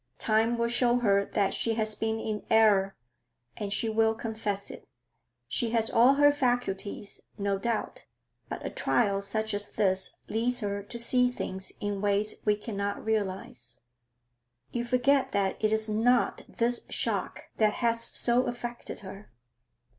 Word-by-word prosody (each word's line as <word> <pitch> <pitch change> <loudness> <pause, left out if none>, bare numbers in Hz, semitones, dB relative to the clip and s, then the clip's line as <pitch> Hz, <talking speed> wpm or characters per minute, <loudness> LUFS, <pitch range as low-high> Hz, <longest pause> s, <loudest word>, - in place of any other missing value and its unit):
Time 225 +2 +2
will 235 0 +1
show 240 0 +2
her 200 -4 +3
that 200 -2 0
she 225 -1 0
has 220 -1 0
been 220 +1 -2
in 215 -1 -4
error, 205 -3 +4 0.6
and 205 -1 -4
she 215 +3 0
will 220 0 +2
confess 220 -3 -4
it. - - -12 0.6
She 230 - +1
has 225 0 +2
all 250 +4 +5
her 290 +1 +6
faculties, 245 -7 -2 0.2
no 200 -1 -1
doubt, 230 +1 -3 0.4
but - - -6
a - - -3
trial 200 -4 +1
such 220 +2 -2
as 205 0 0
this 190 -2 0
leads 245 +3 0
her 200 -1 -2
to 205 +4 -9
see 250 +1 +3
things 190 -6 -5
in 205 -2 -3
ways 205 +1 +1
we 210 -1 +3
cannot 205 -1 -4
realise.' 190 - -3 0.9
'You 240 0 -2
forget 265 +2 +2
that 200 +1 -1
it 215 - +3
is 220 0 +2
not 230 +3 +1
this 240 +1 0
shock - - -2
that 215 -1 +3
has 230 -1 +1
so 245 +2 +2
affected 240 0 -6
her.' 195 +1 -10
220 Hz, 155 wpm, -28 LUFS, 200-235 Hz, 0.9 s, her